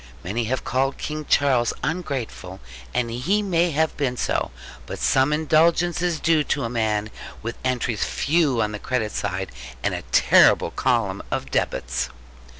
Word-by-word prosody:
Many 110 +6 -2
have 130 +3 -2
called 135 +2 0
King 155 0 -4
Charles 130 -4 +3
ungrateful: 135 - -4 0.3
and 120 -2 -1
he 175 - 0
may 175 -3 +2
have 160 +1 0
been 130 -4 -1
so. - - 0 0.4
But - - -5
some 135 +2 +2
indulgence 165 +3 +2
is 175 -3 0
due 160 -2 +3
to - - -1
a 115 - -2
man, 110 -2 0 0.3
with 115 +2 -5
entries 125 -4 0
few 145 -6 +1
on 105 - -2
the 105 - -5
credit 110 -3 -1
side, 95 -1 -3 0.3
and - - +1
a - - -3
terrible - - +5
column 115 -7 0
of - - -3
debits. - - -1
130 Hz, 155 wpm, -23 LUFS, 110-155 Hz, 0.4 s, terrible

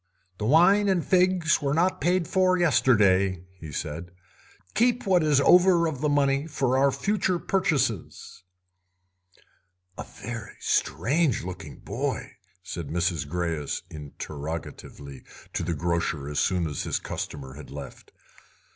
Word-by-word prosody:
"The 105 - -2
wine 195 - +5
and 180 -4 +1
figs 180 -3 +3
were 140 0 0
not 180 +3 +1
paid 180 -1 +1
for 185 -1 +2
yesterday," 100 - +3
he 80 -2 -8
said; 80 +4 -5 0.6
"keep 245 +1 +2
what 185 -3 +4
is 150 -3 +3
over 175 +2 +5
of 150 -5 -3
the 150 - +1
money 140 0 +1
for 130 -5 0
our 140 +1 +4
future 190 +3 0
purchases." 155 - -1 1.6
"A - - -3
very 110 0 -8
strange 130 - +1
looking 85 -6 -8
boy?" 130 0 -3 0.3
said 85 -4 -6
Mrs. 85 -1 -1
Greyes 85 -2 -3
interrogatively 75 -2 -7 0.3
to - - -2
the 85 0 -2
grocer 85 -3 -1
as 75 0 -2
soon 90 -2 +1
as 75 -3 -3
his - - -1
customer 65 -3 -6
had 70 +1 -11
left. 70 0 -10
120 Hz, 130 wpm, -26 LUFS, -, 1.6 s, wine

